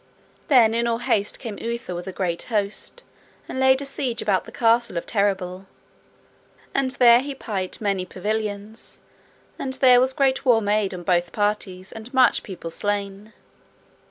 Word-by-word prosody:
Then 235 -6 +5
in 235 +1 +1
all 230 -1 +1
haste 230 -4 0
came 225 -5 -7
Uther 235 -5 -4
with 175 +2 -6
a - - -3
great 175 -2 -2
host, 210 - -3 0.4
and 260 - -5
laid 265 +1 +4
a - - -6
siege 265 -4 -2
about 195 -3 +1
the - - -11
castle 230 -4 +2
of 170 - -3
Terrabil. 190 -2 -1 1.1
And 275 -1 +1
there 240 -3 +6
he 275 +1 -5
pight 195 -7 -4
many 200 -3 -1
pavilions, 210 +3 -5 0.6
and 260 - -3
there 255 -2 +6
was 260 +1 +2
great 270 -1 +1
war 245 -4 +4
made 205 -2 0
on 175 - -8
both 175 0 +1
parties, 205 -3 -2
and 225 +2 -9
much 255 -1 +4
people 175 -4 -8
slain. 205 +2 -3
215 Hz, 160 wpm, -23 LUFS, 195-245 Hz, 1.1 s, there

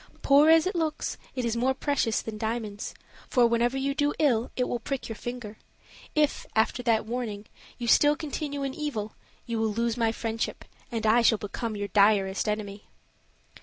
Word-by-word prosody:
"Poor 285 +3 +6
as 325 +1 +6
it 375 - -1
looks, 315 -2 -1 0.2
it 250 -2 -1
is 235 0 0
more 255 +3 +1
precious 260 -5 0
than 215 -1 -6
diamonds; 220 -2 -3 0.3
for 245 -3 +4
whenever 235 +2 +2
you 275 +1 0
do 290 0 0
ill 245 -6 +2
it 250 - 0
will 245 - -2
prick 270 +3 -4
your 225 - -5
finger. 240 -2 -7 0.6
If, 300 -1 +1
after 220 +3 +2
that 230 -3 +2
warning, 220 -3 -4 0.3
you 240 - -4
still 290 +5 +5
continue 295 -2 -4
in 270 -1 -2
evil, 245 -9 -4 0.3
you 230 -1 -2
will 220 0 +1
lose 230 +2 -1
my 230 -2 +2
friendship, 225 0 -3 0.3
and 225 -2 -2
I 225 +3 +5
shall 225 -1 +4
become 215 +2 -4
your 205 0 -4
direst 200 -1 +3
enemy."' 210 -1 -4
235 Hz, 180 wpm, -27 LUFS, 220-275 Hz, 0.6 s, Poor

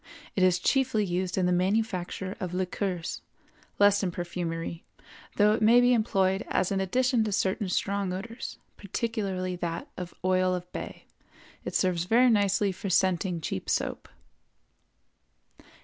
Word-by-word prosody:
It 195 - 0
is 185 -1 +4
chiefly 250 +1 +1
used 180 0 -2
in 185 - +2
the 180 - +2
manufacture 190 0 -1
of 180 -3 -4
liqueurs, 185 -1 -2 0.6
less 205 0 +5
in 190 - 0
perfumery, 170 -1 -4 0.5
though 210 0 +5
it 225 - -1
may 230 +3 +6
be 245 0 +5
employed 195 -3 +1
as 185 - 0
an 195 -1 +1
addition 250 +4 +2
to 215 - -2
certain 190 0 0
strong 200 +1 -1
odors, 230 +6 -6 0.2
particularly 200 -3 -3
that 175 - -4
of 180 -1 -7
oil 185 0 +2
of 180 0 -7
bay; - - -7 0.6
it - - -5
serves 175 -2 +1
very 240 +5 +5
nicely 200 -1 +2
for 190 +2 -5
scenting 180 -1 +1
cheap 95 - -4
soap. - - -2
190 Hz, 145 wpm, -28 LUFS, 180-210 Hz, 0.6 s, may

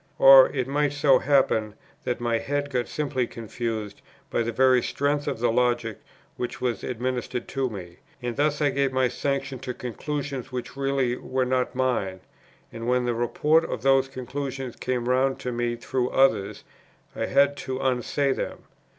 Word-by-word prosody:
Or 135 -1 +9
it 130 -3 -2
might 145 +1 +1
so 145 -3 +4
happen 115 -6 +2 0.3
that 125 -1 -1
my 120 -1 0
head 145 +2 -2
got 125 -2 -1
simply 140 -5 -1
confused, 115 -2 -5 0.3
by - - +1
the 115 0 -1
very 130 +1 +4
strength 145 +3 -1
of - - -1
the 120 0 +1
logic 120 -2 0 0.4
which 125 - -4
was 125 -2 -2
administered 125 0 -3
to 135 -2 -1
me, 90 -5 -9 0.2
and 120 -1 -4
thus 150 +1 +1
I 145 - +3
gave 135 0 +1
my 130 -1 +2
sanction 135 +1 -2
to 125 -1 -5
conclusions 135 +1 -4
which 125 +1 -5
really 135 -3 0
were 130 0 -1
not 125 0 0
mine; 115 -8 -1 0.5
and 115 0 -6
when 125 0 +2
the 120 - +1
report 150 +7 +2
of 115 - -4
those 135 0 +4
conclusions 135 0 -5
came 125 -1 -2
round 130 +1 +2
to 125 - -3
me 120 0 -1
through 125 +1 -2
others, 135 -7 +2 0.5
I - - -2
had 140 +1 +3
to 130 -1 -4
unsay 135 +2 +1
them. - - -5
130 Hz, 170 wpm, -25 LUFS, 120-135 Hz, 0.5 s, Or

